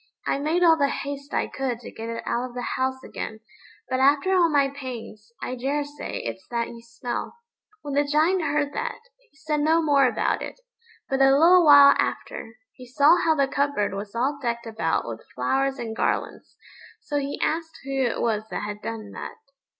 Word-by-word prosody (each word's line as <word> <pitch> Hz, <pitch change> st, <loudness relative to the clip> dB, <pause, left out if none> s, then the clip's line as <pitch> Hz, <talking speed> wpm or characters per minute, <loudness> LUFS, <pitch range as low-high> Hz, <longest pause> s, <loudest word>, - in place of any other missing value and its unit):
I -, -, 0 dB
made 320 Hz, +5 st, +1 dB
all 325 Hz, -2 st, +6 dB
the 280 Hz, -, +4 dB
haste 280 Hz, 0 st, -5 dB
I -, -, 0 dB
could 260 Hz, -4 st, -3 dB
to -, -, -9 dB
get 225 Hz, +1 st, -7 dB
it 230 Hz, 0 st, -5 dB
out 245 Hz, +2 st, -1 dB
of 240 Hz, -, -15 dB
the 245 Hz, -, -3 dB
house 260 Hz, 0 st, -1 dB
again; 220 Hz, -, -6 dB, 0.5 s
but 255 Hz, -, -1 dB
after 285 Hz, +7 st, +3 dB
all 350 Hz, -3 st, +4 dB
my 285 Hz, -3 st, +3 dB
pains, 240 Hz, -5 st, -8 dB
I -, -, -3 dB
daresay 290 Hz, +3 st, -3 dB
it's 190 Hz, -, -6 dB
that 235 Hz, -1 st, -2 dB
you 230 Hz, -1 st, -10 dB
smell." 235 Hz, -, -5 dB, 0.5 s
When 285 Hz, -, -5 dB
the 285 Hz, +1 st, +3 dB
Giant 310 Hz, +6 st, +2 dB
heard 290 Hz, -1 st, 0 dB
that, 480 Hz, +1 st, -3 dB, 0.3 s
he 310 Hz, -, -29 dB
said 310 Hz, -1 st, -2 dB
no 315 Hz, +3 st, +3 dB
more 285 Hz, -4 st, +4 dB
about 245 Hz, -, 0 dB
it; -, -, -7 dB, 0.5 s
but 270 Hz, 0 st, 0 dB
a 270 Hz, 0 st, +6 dB
little 350 Hz, +4 st, +7 dB
while 285 Hz, -2 st, +9 dB
after, 225 Hz, 0 st, -3 dB, 0.2 s
he 250 Hz, -1 st, -13 dB
saw 290 Hz, +6 st, +5 dB
how 320 Hz, -2 st, +2 dB
the 280 Hz, -2 st, +2 dB
cupboard 280 Hz, -8 st, 0 dB
was 200 Hz, +2 st, -6 dB
all 275 Hz, +5 st, 0 dB
decked 235 Hz, -2 st, -2 dB
about 170 Hz, -, -1 dB
with 115 Hz, -1 st, -6 dB
flowers 270 Hz, -, 0 dB
and 225 Hz, -1 st, -5 dB
garlands; -, -, -2 dB, 0.4 s
so 290 Hz, -1 st, -2 dB
he 280 Hz, 0 st, -4 dB
asked 325 Hz, 0 st, -2 dB
who 275 Hz, -, -6 dB
it 240 Hz, -3 st, 0 dB
was 220 Hz, -2 st, 0 dB
that -, -, -4 dB
had 210 Hz, 0 st, -5 dB
done 220 Hz, -2 st, -6 dB
that? -, -, -7 dB
275 Hz, 195 wpm, -25 LUFS, 235-295 Hz, 0.5 s, while